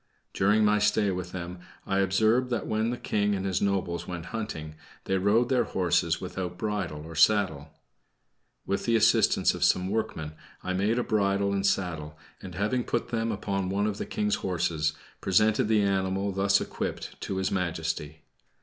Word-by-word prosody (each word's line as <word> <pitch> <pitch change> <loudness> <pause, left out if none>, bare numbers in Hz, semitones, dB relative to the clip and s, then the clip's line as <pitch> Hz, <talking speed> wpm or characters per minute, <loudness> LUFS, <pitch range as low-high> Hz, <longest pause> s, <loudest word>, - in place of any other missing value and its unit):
During 105 +2 +3
my 105 0 +3
stay 105 -1 +2
with 90 -1 -4
them, 90 0 -6 0.3
I 95 0 0
observed 110 +6 +2
that 120 - -1
when 110 +1 0
the 120 - -2
King 105 -2 0
and 95 0 -3
his 95 -2 0
nobles 90 -4 -1
went 85 -2 -5
hunting, 80 -9 -4 0.3
they 95 0 0
rode 110 +5 +3
their 130 -2 +2
horses 85 -3 +1
without 90 -1 -5
bridle 95 -8 -3
or 80 - -9
saddle. 80 -5 +3 1.0
With 100 - -2
the 115 - +2
assistance 115 - +4
of - - -3
some 90 +1 +3
workmen 95 -8 -2 0.3
I 95 - -2
made 100 +5 +1
a 125 - +1
bridle 100 -2 +1
and 100 -1 0
saddle, 85 -6 -1 0.2
and 90 -2 -8
having 105 +6 0
put 120 0 -2
them 115 -1 -1
upon 100 -2 -2
one 100 +2 0
of 105 -1 -2
the - - -4
King's 105 -1 0
horses, 85 -4 0 0.3
presented 110 +4 +3
the 110 -2 +3
animal, 95 0 0
thus 100 +1 +3
equipped, - - -5
to 95 - -3
His 95 0 -1
Majesty. 80 -4 -3
95 Hz, 175 wpm, -27 LUFS, 90-105 Hz, 1.0 s, assistance